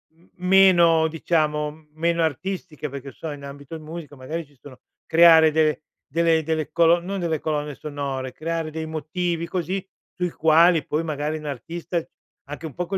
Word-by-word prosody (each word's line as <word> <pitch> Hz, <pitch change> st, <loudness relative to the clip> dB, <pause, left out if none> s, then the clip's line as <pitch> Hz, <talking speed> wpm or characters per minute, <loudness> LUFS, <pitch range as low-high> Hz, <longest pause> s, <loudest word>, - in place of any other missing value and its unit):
m 170 Hz, +2 st, -26 dB, 0.2 s
meno 175 Hz, -4 st, +6 dB
diciamo 155 Hz, -1 st, -1 dB
meno 170 Hz, +2 st, 0 dB
artistiche: 160 Hz, 0 st, -3 dB
"Perché 140 Hz, 0 st, -7 dB
che -, -, -25 dB
so 160 Hz, -, -6 dB
in 145 Hz, -1 st, -9 dB
ambito 140 Hz, +2 st, -9 dB
in 160 Hz, -, -9 dB
musica 155 Hz, -2 st, -9 dB
magari 155 Hz, +6 st, -5 dB
ci 145 Hz, -1 st, -26 dB
sono 130 Hz, +2 st, -13 dB, 0.3 s
creare 160 Hz, -1 st, +7 dB
de 155 Hz, 0 st, +1 dB, 0.2 s
delle 165 Hz, +1 st, +2 dB
delle 155 Hz, -1 st, -2 dB
colo 170 Hz, 0 st, +5 dB
non 190 Hz, +2 st, -4 dB
delle 160 Hz, -3 st, -1 dB
colonne 150 Hz, -1 st, -2 dB
sonore 135 Hz, -3 st, -5 dB
creare 165 Hz, +1 st, -3 dB
dei 160 Hz, +1 st, -4 dB
motivi 165 Hz, +2 st, -3 dB
così 185 Hz, +2 st, -3 dB, 0.3 s
sui 180 Hz, -1 st, -2 dB
quali 160 Hz, +1 st, +4 dB
poi 150 Hz, +2 st, -1 dB
magari 155 Hz, 0 st, -2 dB
n 155 Hz, -, -11 dB
artista 165 Hz, +5 st, -4 dB, 0.4 s
anche 145 Hz, +3 st, -8 dB
un 155 Hz, -, -6 dB
po' 180 Hz, -, -3 dB
con 195 Hz, -, -1 dB
160 Hz, 175 wpm, -23 LUFS, 150-170 Hz, 0.4 s, creare